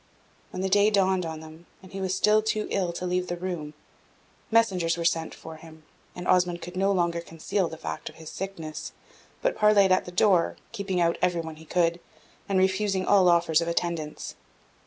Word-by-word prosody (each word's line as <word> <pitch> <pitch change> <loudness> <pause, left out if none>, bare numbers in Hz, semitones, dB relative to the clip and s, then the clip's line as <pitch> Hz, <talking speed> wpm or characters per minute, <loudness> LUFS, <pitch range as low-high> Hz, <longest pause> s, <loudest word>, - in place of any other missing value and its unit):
When 185 - -5
the - - +1
day 205 +2 +4
dawned 190 -4 +2
on 160 -1 -6
them, 160 +2 -13 0.2
and 185 - -14
he 195 - -5
was 190 0 -1
still 210 +2 +4
too 215 0 -1
ill 185 -3 0
to 180 - -5
leave 180 0 -1
the 175 - -3
room, 170 -5 -5 0.7
messengers 185 -7 +2
were 170 - -3
sent 165 -1 0
for 160 -1 -10
him, 160 -1 -14 0.3
and 180 0 -6
Osmond 180 -1 +3
could 180 +1 -8
no 195 +2 +2
longer 170 -3 0
conceal 170 +3 -2
the 160 - -8
fact - - -5
of - - -16
his 160 -1 -10
sickness, 170 -5 -6 0.5
but - - +1
parleyed 210 -2 +5
at 185 - +3
the 180 - -8
door, 180 -1 +3 0.2
keeping 200 -5 -2
out 170 -1 +1
every 175 -2 +1
one 160 -1 -8
he 160 - -13
could, 170 +1 +1 0.5
and 195 - +2
refusing 190 0 +1
all 190 -3 +5
offers 170 -2 +3
of 170 - -2
attendance. 170 -3 -3
180 Hz, 200 wpm, -26 LUFS, 165-195 Hz, 0.7 s, parleyed